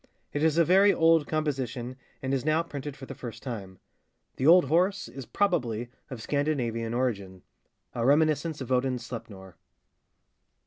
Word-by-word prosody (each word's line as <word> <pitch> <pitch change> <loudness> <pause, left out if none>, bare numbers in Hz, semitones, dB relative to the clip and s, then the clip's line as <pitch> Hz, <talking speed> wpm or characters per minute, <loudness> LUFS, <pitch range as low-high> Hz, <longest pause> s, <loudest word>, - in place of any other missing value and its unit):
It 145 - -1
is 160 0 +2
a 170 - +5
very 195 +4 +6
old 165 -3 +3
composition, 135 -5 -2 0.3
and 130 +1 -1
is 135 - 0
now 155 +2 +2
printed 145 -3 -7
for 135 - -9
the - - -8
first 115 -2 -9
time. 100 -7 -6 0.6
The 130 - +1
'old 175 0 +7
horse' 185 +7 +1
is, 135 -3 -9
probably, 125 - 0 0.2
of 125 -5 -7
Scandinavian 120 -6 -1
origin,—a 100 - -5
reminiscence 155 +2 +2
of 130 - -6
Odin's 125 -1 0
Sleipnor. 95 -7 -9
135 Hz, 145 wpm, -28 LUFS, 115-155 Hz, 0.6 s, old